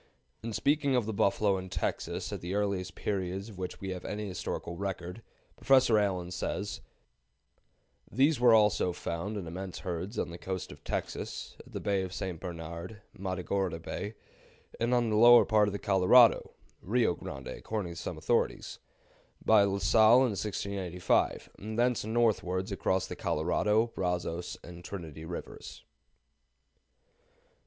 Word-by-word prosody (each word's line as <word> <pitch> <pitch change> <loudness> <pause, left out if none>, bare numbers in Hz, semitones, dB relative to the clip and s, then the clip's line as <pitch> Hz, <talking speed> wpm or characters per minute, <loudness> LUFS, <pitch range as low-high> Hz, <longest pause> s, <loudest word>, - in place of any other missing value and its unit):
In 115 - -5
speaking 140 +4 +1
of 125 -4 +2
the 110 - -3
buffalo 100 0 +2
in 95 0 -8
Texas - - -3
at - - -5
the 90 +3 -3
earliest 95 -4 -1
periods 95 +1 -3
of 100 -4 -11
which 90 -1 -5
we 95 -1 -4
have 90 -1 -6
any 105 0 -4
historical 90 -2 -4
record, 95 +1 -5 0.4
Professor 130 -5 +5
Allen 90 -4 -1
says: 100 +3 -3 1.3
"They 135 +7 +4
were 120 -2 +7
also 105 -4 +3
found 90 +6 -4
in 95 - -5
immense 90 +2 -6
herds 90 +3 -4
on - - -2
the 85 - -8
coast 95 -1 -4
of - - -13
Texas, - - -4
at - - -14
the - - -3
Bay 100 -2 0
of 95 -1 -5
St. 90 -4 -4
Bernard 85 +5 -7
(Matagorda 95 -2 -2
Bay), 100 +6 -5 0.6
and 115 +1 +1
on 120 -2 +2
the - - +2
lower 120 +2 +8
part 105 -2 +4
of - - -1
the 100 - -3
Colorado 100 +5 +5 0.3
(Rio 115 0 +2
Grande, 65 -5 -8
according 105 -6 -4
to - - -8
some - - -5
authorities), - - -1 0.7
by 110 -2 +6
La 100 -1 +2
Salle, 110 +5 +6
in 125 - +1
1685, 95 -3 -1
and 110 +2 -6
thence 120 0 +2
northwards 105 -5 0
across 95 -1 0
the - - -6
Colorado, 105 +8 +1
Brazos, 90 -1 -2
and 85 0 -10
Trinity 80 -5 -7
Rivers." 85 +1 -8
95 Hz, 150 wpm, -30 LUFS, 90-110 Hz, 1.3 s, lower